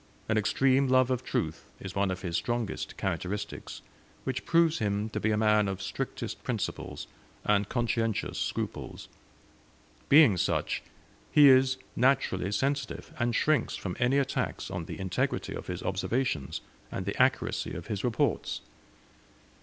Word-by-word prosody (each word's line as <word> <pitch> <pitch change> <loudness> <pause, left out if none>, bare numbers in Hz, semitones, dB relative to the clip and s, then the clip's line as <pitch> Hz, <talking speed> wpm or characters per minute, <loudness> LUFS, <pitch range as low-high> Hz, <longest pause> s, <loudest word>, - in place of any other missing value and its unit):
An 110 - +1
extreme 130 +5 +3
love 130 0 +4
of 130 0 0
truth 80 -8 -2
is 95 -1 -7
one 100 0 +1
of 90 0 -4
his 85 -2 -2
strongest 120 0 -2
characteristics, 100 +3 -4 0.4
which 130 0 -3
proves 165 -1 +4
him 105 +1 0
to - - -3
be 110 - +1
a 105 - +2
man 105 -1 +4
of 95 -1 -3
strictest 95 - -4
principles, - - -3 0.4
and 105 -1 +2
conscientious 115 -3 -1
scruples; - - -4 1.0
being 140 - +7
such, - - 0 0.5
he 145 -2 +8
is 130 0 +5 0.2
naturally 125 -8 +2
sensitive, 135 +2 -2
and 120 0 +1
shrinks 155 +3 +2
from 90 -3 -4
any 125 +3 +3
attacks 140 -1 -1
on 85 - -3
the - - -7
integrity 95 -2 -1
of - - -7
his 90 0 -4
observations, 95 - -1 0.3
and - - -4
the - - 0
accuracy - - +1
of - - -6
his 100 -2 -3
reports. 120 -3 0
110 Hz, 145 wpm, -29 LUFS, 100-130 Hz, 1.0 s, he